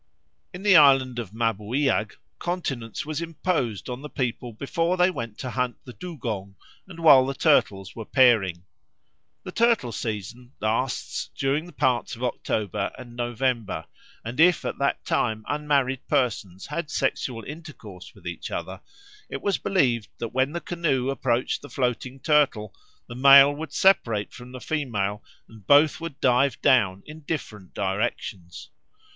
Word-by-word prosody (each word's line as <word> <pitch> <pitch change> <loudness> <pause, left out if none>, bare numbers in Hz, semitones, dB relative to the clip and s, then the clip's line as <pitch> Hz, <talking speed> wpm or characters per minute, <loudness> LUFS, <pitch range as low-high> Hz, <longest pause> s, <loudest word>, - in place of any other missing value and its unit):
In 180 +2 -9
the 205 -2 +6
island 135 -4 +5
of 115 -6 -5
Mabuiag 115 +1 0 0.2
continence 145 - -3
was 155 +1 -3
imposed 160 - -2
on 125 +1 -5
the 150 - -8
people 125 -3 -3
both 110 - -19
before 165 +7 -1
they 180 +1 +4
went 115 - -6
to 125 - -5
hunt 125 -2 -2
the 125 - -10
dugong 115 - -6 0.3
and 175 -3 -11
while 145 -5 +8
the 135 +1 -3
turtles 95 -5 +2
were 115 - -6
pairing. 105 -9 +3 0.8
The - - -7
turtle 230 - +2
season 115 +4 -5
lasts 115 +4 -2
during 145 +6 -1
parts 125 0 0
of 120 - -9
October 110 -5 -2
and 120 -2 -11
November; 120 -7 -2 0.4
and 120 +5 -6
if 175 +1 +5
at - - -4
that 140 0 0
time 110 -2 0
unmarried 140 -3 0
persons 100 -7 -1
had 150 +1 -4
sexual 120 -4 -2
intercourse 135 - -10
with - - -18
each - - -5
other, - - -5 0.5
it - - -6
was 200 - +1
believed 130 - +1
that 115 -1 -5
when 130 +2 +1
the 170 - -3
canoe 135 -7 -1
approached 125 -2 -1
the 145 - -11
floating 125 +1 -2
turtle, 135 -9 +2 0.3
the - - -9
male 140 +2 +8
would 150 0 -7
separate 120 - +2
from 125 0 -11
the 130 - -8
female 105 -10 -2 0.2
and 110 -4 -17
both 145 +3 +5
would 160 -4 -6
dive 130 +1 +2
down 100 -7 +3
in 155 +1 -10
different 110 - -6
directions. 95 -2 -3
125 Hz, 150 wpm, -25 LUFS, 110-150 Hz, 0.8 s, while